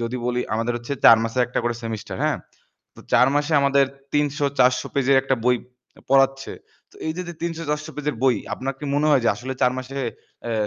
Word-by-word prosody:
যদি 120 Hz, +2 st, -3 dB
বলি 125 Hz, 0 st, 0 dB
আমাদের 115 Hz, +2 st, -1 dB
হচ্ছে 120 Hz, +3 st, -6 dB
৪ 115 Hz, -, +10 dB
মাছে 115 Hz, +2 st, -3 dB
একটা 125 Hz, -, -3 dB
করে 120 Hz, -, 0 dB
সেমেস্টার, 115 Hz, -2 st, -5 dB
হ্যাঁ? -, -, +1 dB, 0.6 s
তো -, -, -14 dB
৪ 125 Hz, -, +6 dB
মাসে 145 Hz, +2 st, 0 dB
আমাদের 140 Hz, 0 st, +4 dB, 0.3 s
৩০০-৪০০ 140 Hz, -3 st, +2 dB
পেজের 140 Hz, 0 st, +3 dB
একটা 135 Hz, 0 st, +1 dB
বই 125 Hz, 0 st, +4 dB, 0.4 s
অ্যাম -, -, -20 dB
পড়াচ্ছে। 135 Hz, 0 st, +3 dB, 0.4 s
তো -, -, -20 dB
এই 160 Hz, -, -1 dB
দে, 180 Hz, -, -3 dB
দে 175 Hz, -, -6 dB
৩০০-৪০০ 160 Hz, -2 st, -3 dB
পেজের 150 Hz, 0 st, -2 dB
বই, 130 Hz, -3 st, +4 dB, 0.2 s
আপনার 135 Hz, +1 st, -4 dB
কি -, -, -8 dB
মনে 145 Hz, +1 st, +2 dB
হয় 140 Hz, -4 st, +4 dB
যে -, -, +4 dB
আসলে 125 Hz, +4 st, -5 dB
৪ 125 Hz, -, +4 dB
মাসে 130 Hz, +2 st, -7 dB, 0.5 s
এ -, -, -1 dB
135 Hz, 205 wpm, -23 LUFS, 125-145 Hz, 0.6 s, ৪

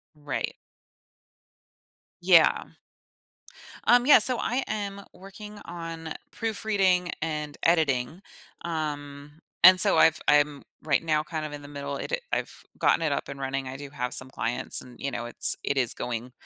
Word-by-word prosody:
Right. 145 Hz, -2 st, -4 dB, 1.7 s
Yeah. -, -, +5 dB, 1.2 s
Um, 245 Hz, +2 st, +5 dB
yeah, 290 Hz, -, +8 dB
so 250 Hz, +2 st, +4 dB
I 255 Hz, +3 st, -1 dB
am 200 Hz, -2 st, -4 dB
working 205 Hz, +2 st, -12 dB
on 165 Hz, -2 st, -7 dB, 0.2 s
proofreading 200 Hz, -5 st, 0 dB
and 150 Hz, -2 st, -4 dB
editing, 155 Hz, -1 st, +1 dB, 0.4 s
um, 150 Hz, -2 st, -6 dB, 0.2 s
and 185 Hz, +1 st, +9 dB
so, 200 Hz, 0 st, +6 dB
I've 160 Hz, -, +4 dB
I'm 145 Hz, -1 st, +2 dB, 0.2 s
right 150 Hz, -3 st, +1 dB
now 155 Hz, -2 st, +1 dB
kind 155 Hz, 0 st, -5 dB
of 150 Hz, -, -9 dB
in 145 Hz, 0 st, -8 dB
the 145 Hz, -, -11 dB
middle 140 Hz, -1 st, -6 dB
it -, -, -6 dB, 0.2 s
I've -, -, -2 dB, 0.3 s
gotten -, -, +3 dB
it 155 Hz, -3 st, 0 dB
up -, -, -3 dB
and 140 Hz, -, -8 dB
running. 135 Hz, 0 st, -3 dB
I 130 Hz, -, -7 dB
do 140 Hz, 0 st, -10 dB
have 125 Hz, -3 st, -4 dB
some 130 Hz, -, +2 dB
clients 120 Hz, -1 st, +1 dB
and, 125 Hz, -1 st, -15 dB
you 140 Hz, -, -3 dB
know, 120 Hz, -1 st, -4 dB
it's 120 Hz, -, +3 dB
it 140 Hz, -, -2 dB
is 125 Hz, -3 st, +1 dB
going 120 Hz, +1 st, -5 dB
150 Hz, 155 wpm, -26 LUFS, 140-185 Hz, 1.7 s, and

